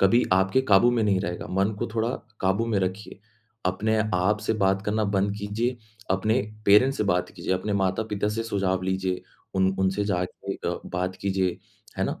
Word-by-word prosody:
कभी 115 +5 +5
आपके 95 +7 +3
काबू 120 +1 +5
में 120 -2 +1
नहीं 100 -3 +2
रहेगा, 90 -2 -4
मन 95 +3 +1
को - - -1
थोड़ा 115 +1 +1 0.3
काबू 95 +5 +1
में 110 -4 +1
रखिए। 95 +2 -4 0.5
अपने 110 +4 +1 0.2
आप 95 +4 +2
से 110 - 0
बात 95 -1 +1
करना 110 +1 +1
बंद 100 0 +1
कीजिए, 110 +5 -1 0.3
अपने 110 +6 +2 0.3
पेरेंट्स 125 +7 +6
से 105 - +1
बात 90 -2 +1
कीजिए, - - -3
अपने 100 +3 -2
माता-पिता 100 +2 0
से 115 +2 -2
सुझाव 95 -4 -1
लीजिए, 95 0 -1 0.3
उन 95 0 +2
उनसे 95 +2 +1
जाके 90 -3 -2
अ, - - -3
बात 90 +1 -3
कीजिए, 95 -2 0 0.4
है - - +2
ना - - -3
100 Hz, 180 wpm, -26 LUFS, 95-110 Hz, 0.5 s, पेरेंट्स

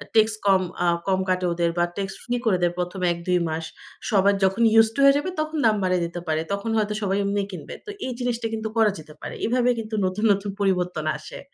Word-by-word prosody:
Tax 220 0 +5
কম 195 -1 +5 0.2
আ 175 - +2 0.2
কম 190 -1 +2
কাটে 185 0 +1
ওদের 170 0 +1
বা 175 - +3
ট্যাক্স 195 -1 -3
ফ্রি 245 - -2
করে 195 -5 +3
দেয় 175 0 +2
১ম 180 +1 -3
১-২ 175 +1 0
মাস। 160 +1 -3 0.4
সবার 200 -1 +4
যখন 190 +4 +2
ইউস 225 0 +7
টু - - -4
হয়ে 275 0 +7
যাবে, 300 +6 -2
তখন 310 +1 -2
দাম 220 - +5
বাড়িয়ে 185 -2 +1
দিতে 170 +1 -5
পারে। 155 0 +1
তখন 200 +3 -3
হয়তো 210 -1 0
সবাই 195 -1 0
এমনি 200 +1 0
কিনবে। 175 -5 -8
তো - - -9 0.2
এই 260 - -3
জিনিসটা 245 -2 -1
কিন্তু 220 0 -2
করা 220 -2 +5
যেতে 155 0 -12
পারে। - - -6
এভাবে 245 +2 +2
কিন্তু 220 0 -4
নতুন, 185 +4 -2
নতুন 200 0 0
পরিবর্তন 180 -5 0
আসে। - - -10
195 Hz, 225 wpm, -24 LUFS, 180-220 Hz, 0.4 s, ইউস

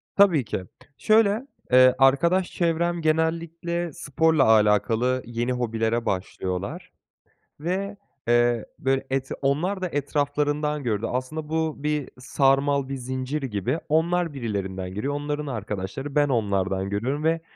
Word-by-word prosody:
Tabii 175 - +5
ki. 95 - -3 0.3
Şöyle, 215 +3 +3 0.2
eee, 130 0 +7
arkadaş 170 +8 +3
çevrem 170 0 0
genellikle 165 +1 -1
sporla 155 +1 +2
alakalı 110 +3 +3
yeni 120 +1 -2
hobilere 115 -1 -1
başlıyorlar 95 0 -3 0.7
ve, 195 +6 -3 0.3
eee, 120 -1 +3
böyle, 135 0 0
et 135 0 -1
onlar 165 +8 0
da 185 - 0
etraflarından 145 0 -1
gördü. 110 -3 -1
Aslında 150 +5 -4
bu 160 -2 -2
bir 150 -2 -1
sarmal, 135 +1 +2
bir 135 - -3
zincir 130 +3 -3
gibi. 125 - -2
Onlar 165 +1 +1
birilerinden 95 -7 -4
görüyor, 115 +9 -2
onların 145 +1 -3
arkadaşları, 105 +3 -5
ben 145 -1 +3
onlardan 100 -5 0
görüyorum 125 +9 -2
ve 165 +1 +1
135 Hz, 125 wpm, -25 LUFS, 120-160 Hz, 0.7 s, eee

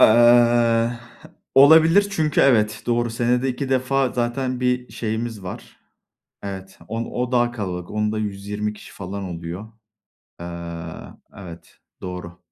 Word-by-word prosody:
Eee, 120 0 +5 0.6
olabilir 160 +8 +7
çünkü 155 -6 +1
evet, 110 -6 +3
doğru 120 -1 +1
senede 120 +3 +1
2 130 +2 -3
defa 130 0 +1
zaten 125 +1 -2
bir 125 0 -1
şeyimiz 110 -2 -4
var. 90 - -9 0.7
Evet, 95 -1 -7
on 115 +2 -3
o 125 0 -3
daha 120 -1 +2
kalabalık. 90 -6 -5
Onda 105 0 -1
120 105 +1 -3
kişi 105 - -14
falan 100 +1 -6
oluyor. 90 +4 -7 0.7
Eee, 85 - -6 0.9
evet 85 -4 -12 0.2
doğru. 90 -1 -7
115 Hz, 120 wpm, -22 LUFS, 100-125 Hz, 0.9 s, olabilir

